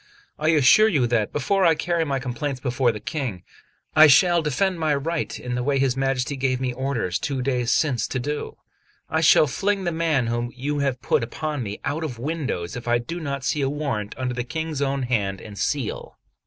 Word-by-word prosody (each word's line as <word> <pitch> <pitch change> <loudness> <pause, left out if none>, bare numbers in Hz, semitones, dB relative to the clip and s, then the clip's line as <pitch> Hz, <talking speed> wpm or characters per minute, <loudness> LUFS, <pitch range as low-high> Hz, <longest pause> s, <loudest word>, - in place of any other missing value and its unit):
I 155 - 0
assure 160 +7 +6
you 145 - +2
that, 115 -3 0
before 195 +7 +1
I 165 -2 +5
carry 170 +1 0
my 140 -2 -1
complaints 130 +1 -3
before 125 -1 +1
the 105 - -7
King, 125 - -4 0.5
I 155 0 +9
shall 170 +4 +5
defend 170 +5 0
my 155 -2 +1
right 160 +4 -3
in 125 0 -5
the 125 - -1
way 140 +2 +1
his 135 -2 +1
Majesty 135 0 -1
gave 130 -1 0
me 130 -1 -2
orders 120 -9 -2
two 135 -3 -2
days 125 -3 0
since 135 -3 +1
to - - -3
do. 145 +4 -4 0.5
I 160 - +1
shall 160 - +6
fling 195 +8 -1
the 175 - 0
man 160 -6 +1
whom 120 +1 -2
you 145 +3 -2
have 135 -3 -1
put - - +2
upon 150 +4 -3
me 105 -3 -5
out 145 +4 -2
of 135 -7 -4
windows 135 - -3
if 120 -1 -7
I 120 0 +3
do 165 +9 -5
not 140 -4 -4
see 145 +3 0
a 135 - +1
warrant 135 -8 -3
under 125 -1 -2
the 125 0 -2
King's 160 +1 -4
own 135 -1 0
hand 100 -6 -1
and 105 -2 -10
seal." 135 +3 -3
135 Hz, 210 wpm, -23 LUFS, 125-155 Hz, 0.5 s, I